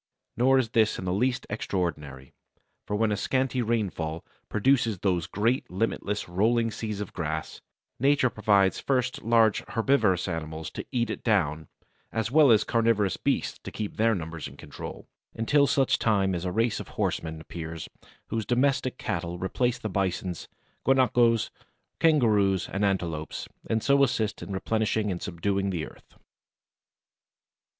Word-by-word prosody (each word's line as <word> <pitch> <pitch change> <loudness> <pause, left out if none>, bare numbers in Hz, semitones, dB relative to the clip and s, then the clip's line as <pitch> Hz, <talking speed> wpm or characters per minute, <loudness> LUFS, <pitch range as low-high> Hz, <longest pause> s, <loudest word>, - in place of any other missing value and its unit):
Nor 130 +3 +4
is 125 -4 +1
this 110 -2 +3
in 95 - -5
the 90 - 0
least 125 +6 0
extraordinary, 75 -10 -3 0.5
for 105 - -1
when 110 0 +2
a - - +1
scanty 130 +4 0
rainfall 95 -9 -2 0.2
produces 115 -1 +2
those 90 -3 0
great 115 +6 0
limitless 105 +1 -2
rolling 115 +6 +2
seas 105 -2 -4
of 105 - -6
grass, 80 -3 -4 0.4
Nature 135 -1 +3
provides 100 -3 +3
first 130 -2 0
large 115 -1 +3
herbivorous 110 -7 +2
animals 80 -2 -4
to - - -7
eat 120 -4 0
it - - -6
down 80 -9 +1 0.4
as 115 0 -2
well 150 -1 +6
as 110 -2 +6
carnivorous 115 -5 +2
beasts - - -1
to - - -6
keep 105 -2 -5
their 115 0 +3
numbers 80 -3 -5
in 70 0 -13
control, 75 -1 -9 0.3
until 140 +6 +3
such 135 -1 +2
time 100 -4 +2
as 90 0 -3
a 90 - -1
race 115 +2 +1
of - - -7
horsemen 80 -1 -1
appears, 80 0 -7 0.4
whose 115 -1 -1
domestic 130 +2 +1
cattle 85 +1 -3
replace 120 +7 0
the - - -5
bisons, 95 -2 -2 0.4
guanacos, 120 -4 +3 0.5
kangaroos, 105 - +3
and 95 +2 -2
antelopes, 85 -6 -2 0.2
and 110 -1 0
so 140 0 +4
assist 110 -5 0
in - - -7
replenishing 110 +1 0
and 90 - -4
subduing 100 +2 -1
the 85 -5 -2
earth. - - -16
105 Hz, 150 wpm, -27 LUFS, 90-120 Hz, 0.5 s, well